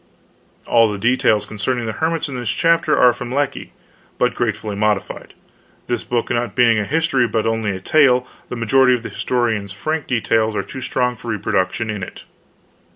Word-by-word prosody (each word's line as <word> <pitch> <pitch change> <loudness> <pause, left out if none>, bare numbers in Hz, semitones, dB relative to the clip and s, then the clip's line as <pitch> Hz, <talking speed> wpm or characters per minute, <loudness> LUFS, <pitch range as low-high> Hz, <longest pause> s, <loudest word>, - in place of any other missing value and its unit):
* - - -37 0.2
[*All 115 -2 +4
the 105 - -4
details 115 -1 +2
concerning 120 +3 -2
the 110 - -2
hermits, 160 +6 -1
in 140 - -6
this 120 -3 -3
chapter, 165 +4 +2
are 125 -1 +6
from 125 0 -7
Lecky 145 +2 -2 0.5
but - - +1
greatly 105 -2 -2
modified. 105 -1 -2 0.5
This 120 - -2
book 120 -1 -2
not 120 -3 -1
being 115 -3 +4
a 105 - -1
history 145 -4 +1
but 110 0 -1
only 115 -1 0
a - - -6
tale, 125 +3 +3 0.2
the - - -4
majority 125 +2 +3
of 120 - -6
the 115 - -5
historian's 110 -3 -1
frank 155 +9 -3
details 110 -2 +1
were - - -1
too 130 - -8
strong 125 -1 -1
for 120 - -12
reproduction 105 0 -1
in 105 -2 -5
it. 90 - -8
120 Hz, 185 wpm, -19 LUFS, 110-125 Hz, 0.5 s, are